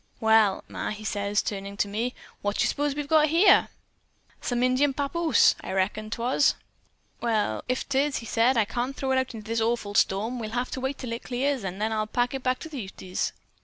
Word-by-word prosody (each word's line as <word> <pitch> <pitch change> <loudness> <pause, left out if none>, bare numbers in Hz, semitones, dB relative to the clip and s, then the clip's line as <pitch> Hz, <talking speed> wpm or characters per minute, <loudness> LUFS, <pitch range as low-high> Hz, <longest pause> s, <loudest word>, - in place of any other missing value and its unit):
"'Well, 220 -3 +4
Ma,' - - -4
he 215 0 -6
says, 205 -1 0
turning 200 0 -5
to 205 - +1
me, 225 +5 -2 0.3
'what 205 0 -1
d' - - +1
s'pose 290 -1 0
we've 295 -1 -3
got 310 0 +5
here?' 345 +6 +5 0.7
"'Some 245 0 -1
Indian 260 +2 +2
papoose,' 315 +4 +3
I - - -5
reckoned 210 +3 -1
'twas. 245 +4 +2 0.7
"'Well, 215 - 0
if 255 - -1
'tis,' 280 +1 +1
said 235 +5 +3
he, 230 - +4
'I - - +1
can't 245 +5 -3
throw 265 -2 -2
it 260 - +3
out 260 -2 -3
into 215 -1 -9
this 230 0 0
awful 225 -2 -1
storm. 215 +5 +1
We'll 220 +1 -4
have 250 +1 -1
to 260 - -4
keep 265 - 0
it 280 - -6
till 250 -3 -6
it 235 - -4
clears, 260 0 -1
an' 190 -1 -4
then 215 +2 -1
I'll 215 -1 -1
pack 245 +3 0
it 270 - -3
back 255 0 +1
to 320 - -7
the 285 -5 -5
Utes.' 185 0 -3
240 Hz, 220 wpm, -26 LUFS, 215-265 Hz, 0.7 s, got